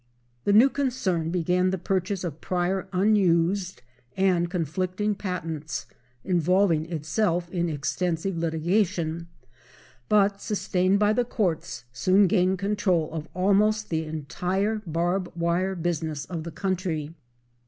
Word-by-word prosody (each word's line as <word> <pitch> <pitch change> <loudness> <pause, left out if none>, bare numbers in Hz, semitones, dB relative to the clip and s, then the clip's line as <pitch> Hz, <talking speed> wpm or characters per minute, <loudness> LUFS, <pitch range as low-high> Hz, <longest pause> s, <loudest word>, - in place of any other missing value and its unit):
The - - +3
new 225 +6 +8
concern 195 - -1
began 180 +1 +1
the 190 - -1
purchase 190 +1 -1
of 165 -3 -5
prior 185 +2 -1
unused 185 -2 +2 0.3
and 180 -3 +2
conflicting 185 +4 -1
patents 165 -6 -4 0.4
involving 175 -2 +2
itself 170 +3 0
in 175 -2 0
extensive 165 +5 -2
litigation, 170 0 0 0.8
but, 200 -1 +3
sustained 190 -2 +1
by 210 +1 +3
the 245 - +2
courts, 190 - -2
soon 185 +11 +4
gained 185 -1 +2
control 195 -4 0
of 160 -1 -5
almost 210 +3 +2
the 160 0 0
entire 180 +8 -2
barb 175 +3 -1
wire 175 +3 0
business 160 -4 -2
of 165 -3 -5
the 170 - -5
country. 180 -4 -2
180 Hz, 120 wpm, -26 LUFS, 165-195 Hz, 0.8 s, new